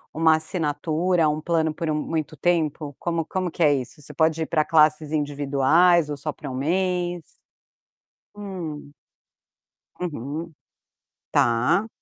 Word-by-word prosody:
uma 160 0 +5
assinatura, 160 +1 0
um 150 +1 -1
plano 160 -1 0
por 165 0 -3
um 155 - +1
muito 155 0 -3
tempo? 155 -2 0
Como 170 -2 -1
como 185 +2 -2
que 170 - -1
é 150 -2 +5
isso? 140 +3 -4
Você 150 0 -12
pode 160 +1 +1
ir - - -2
para 155 -1 +1
classes 155 -1 +3
individuais 145 +3 +3
ou 145 - -4
só 150 +2 -3
para 145 -2 -8
1 - - -6
mês? 175 +3 -1 1.1
Hum. 175 -8 -7 1.1
Uhum. 160 0 -5 0.8
Tá. 125 - +2
155 Hz, 135 wpm, -24 LUFS, 150-170 Hz, 1.1 s, uma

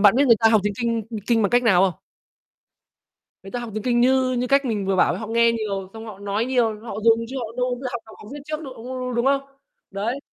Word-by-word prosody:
bạn 205 +2 +6
biết 280 +1 +4
người 230 - +6
ta 225 - +6
học 220 -2 +4
tiếng 205 - 0
Kinh, 230 -1 0
ưm, 220 -2 -4
Kinh 230 -2 +3
bằng 200 - +1
cách 245 +1 +3
nào 190 -6 +4
không? 185 -4 0 1.4
Người 195 - -10
ta 245 - -3
học 240 - -6
tiếng 215 - -4
Kinh 240 -1 +2
như 260 0 +3
như 250 0 -1
cách 275 +1 +3
mình 210 -5 -1
vừa 195 -1 +1
bảo - - +4
ấy, - - -5
họ 220 - -6
nghe 230 +1 +3
nhiều, 200 -4 -3
xong 225 0 -9
họ 210 -3 -9
nói 205 +3 -1
nhiều, 235 -5 +1
họ 210 - -6
dùng 230 0 +5
chứ 265 +2 -6
họ 235 - -3
đâu 250 0 0
bao 245 - -11
giờ 260 - -3
học 240 - -3
học 220 - -14
học 210 - -12
viết 290 - -7
trước 310 +1 -4
đâu, 265 -2 -8
đu 225 - -12 0.2
đu 250 -1 -3
đúng 235 +1 0
không? 275 0 +3 0.5
Đấy. 215 +7 -2
230 Hz, 290 wpm, -23 LUFS, 210-250 Hz, 1.4 s, bạn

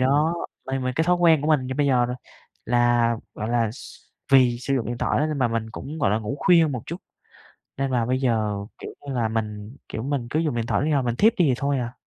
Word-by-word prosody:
đó, 145 +5 +2 0.3
mà 135 0 -2
mình 130 -1 -2
cái 160 - +2
thói 180 +1 +3
quen 165 -4 +4
của 150 - -1
mình 145 -5 +2
như 130 - -4
bây 145 +1 +1
giờ 125 -3 +3
nè 125 - -3 0.5
là, 120 -1 +2 0.2
gọi 110 - -4
là, 115 -2 +1
s 125 - -11 0.4
vì 125 -3 +5
sử 135 +3 -1
dụng 125 -4 -1
điện 120 0 -4
thoại - - 0
á 150 - +2
nên 155 -2 -3
mà 125 -3 +2
mình 115 -1 -3
cũng, 150 +7 -7
gọi 135 - +2
là, 105 - +2
ngủ 110 +5 -4
khuya 170 -3 +5
một 125 -5 -4
chút 170 - -4 0.8
nên 135 0 -1
là 120 -3 +1
bây 130 +2 0
giờ, 110 -5 0 0.2
kiểu - - -7 0.2
như 140 - -3
là, 120 -3 0
mình, 110 0 -4
kiểu, 110 - -5
mình 135 -3 -2
cứ 155 - 0
dùng 155 -6 -1
điện 115 -1 -1
thoại - - 0
đến 145 - 0
khi - - +1
nào 140 -3 +2
mình 120 -1 -1
thiếp 220 - +4
đi 180 - +4
thì 135 - +3
thôi 140 -1 0
à. 120 0 -4
130 Hz, 275 wpm, -24 LUFS, 115-145 Hz, 0.8 s, vì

